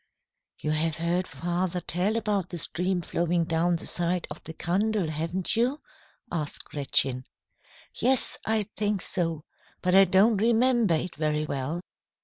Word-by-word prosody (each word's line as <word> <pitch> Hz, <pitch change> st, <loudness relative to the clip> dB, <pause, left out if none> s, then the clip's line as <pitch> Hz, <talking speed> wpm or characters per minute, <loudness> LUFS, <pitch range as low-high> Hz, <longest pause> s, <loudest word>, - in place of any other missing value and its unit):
"You 150 Hz, -, -2 dB
have 155 Hz, +1 st, +2 dB
heard 175 Hz, +3 st, -1 dB
father 175 Hz, +1 st, -2 dB
tell 180 Hz, +5 st, -1 dB
about 205 Hz, -5 st, -1 dB
the 175 Hz, -, -5 dB
stream 180 Hz, +3 st, -1 dB
flowing 170 Hz, +1 st, 0 dB
down 165 Hz, +1 st, +1 dB
the 165 Hz, -, -3 dB
side 175 Hz, 0 st, 0 dB
of 150 Hz, -, -8 dB
the 160 Hz, -, -5 dB
Kandel, 195 Hz, 0 st, 0 dB
haven't 165 Hz, +6 st, -1 dB
you?" 250 Hz, +6 st, +1 dB, 0.5 s
asked 155 Hz, -4 st, -3 dB
Gretchen. 135 Hz, -3 st, 0 dB, 0.7 s
"Yes, 260 Hz, +1 st, +1 dB
I 220 Hz, -1 st, +1 dB
think 205 Hz, -2 st, 0 dB
so. 165 Hz, -4 st, -1 dB, 0.4 s
But 180 Hz, 0 st, +2 dB
I 195 Hz, +1 st, +8 dB
don't 195 Hz, +4 st, +4 dB
remember 230 Hz, -2 st, +3 dB
it 170 Hz, +2 st, -3 dB
very 155 Hz, 0 st, 0 dB
well. 145 Hz, +4 st, -3 dB
175 Hz, 145 wpm, -27 LUFS, 160-200 Hz, 0.7 s, I